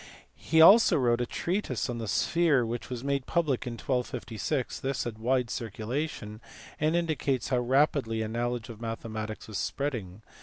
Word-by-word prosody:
He 160 0 +3
also 200 +5 +8
wrote 120 -3 +2
a 120 - -1
treatise 175 - -2
on 120 -1 -4
the 115 - -4
sphere 155 -1 +2
which 115 +1 -4
was 125 -1 -5
made 140 -1 -1
public 150 -8 0
in 120 - -3
1256: 125 +1 -2
this 135 -1 -2
had 115 -2 -5
a - - -18
wide 125 0 +1
circulation, 110 0 -4 0.4
and 155 +2 +2
in 170 0 +2
dicates 140 -5 -1
how 125 -2 +2
rapidly 125 -3 +2
a - - -3
knowledge 120 +1 -2
of 115 -1 -9
mathematics 110 -2 -5
was 110 -2 -4
spreading. 110 -8 -3
125 Hz, 175 wpm, -29 LUFS, 115-140 Hz, 0.4 s, also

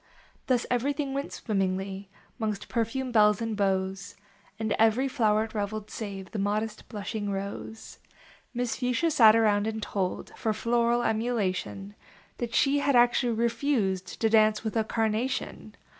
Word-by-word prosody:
Thus 250 -2 +2
everything 275 +3 0
went 275 +1 -3
swimmingly 195 -1 -2 0.3
Mongst 215 -2 -3
perfumed 245 +2 -2
belles 210 -2 +5
and 225 -1 -2
beaux, 190 -2 +1 0.6
And 220 -1 -1
ever} 225 +3 +4
floweret 220 -4 +1
reveled 210 0 -4
save 195 -3 -6
The 220 - -4
modest, 210 +2 -2
blushing 210 -1 -4
Rose. 200 +3 -6 0.5
Miss 245 -1 -2
Fuchsia 250 +6 +1
sat 220 -6 +7
around 210 -2 +3
and 220 0 -3
told, 195 -3 -3
For 220 - -1
floral 235 +2 +1
emulation, 205 -4 -1 0.5
That 235 -1 -3
she 280 +1 +3
had 280 -1 +2
actually 240 0 +4
refused 220 -5 -1
To 225 - +3
dance 215 -1 +4
with 220 0 -3
A 225 - +2
Carnation. 225 +4 -2
220 Hz, 140 wpm, -28 LUFS, 205-240 Hz, 0.6 s, sat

